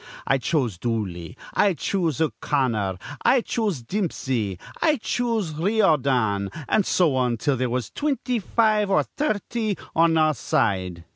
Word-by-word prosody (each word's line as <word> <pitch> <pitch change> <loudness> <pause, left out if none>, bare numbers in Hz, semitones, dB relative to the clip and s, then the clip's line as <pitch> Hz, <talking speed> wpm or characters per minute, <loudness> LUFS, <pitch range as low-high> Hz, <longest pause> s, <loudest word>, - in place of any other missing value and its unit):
'I 135 - +2
choose 120 - -1
Dooley,' 105 -4 -3 0.2
'I 200 -3 +3
choose 165 -5 -1
O'Connor,' 120 - 0 0.3
'I 255 - +4
choose 205 - -2
Dimpsey,' 130 - -2 0.2
'I 310 -2 +4
choose 225 -7 -1
Riordan,' 140 - +2 0.2
an' 215 - +3
so 165 -7 +2
on 125 -2 +1
till 135 +5 0
there 130 0 -1
was 125 -1 -2
twinty 270 -5 -1
five 215 0 +2
or 195 - +3
thirty 220 -5 -2 0.2
on 165 0 +4
a 155 -1 +4
side. 95 - -1
150 Hz, 135 wpm, -24 LUFS, -, 0.3 s, I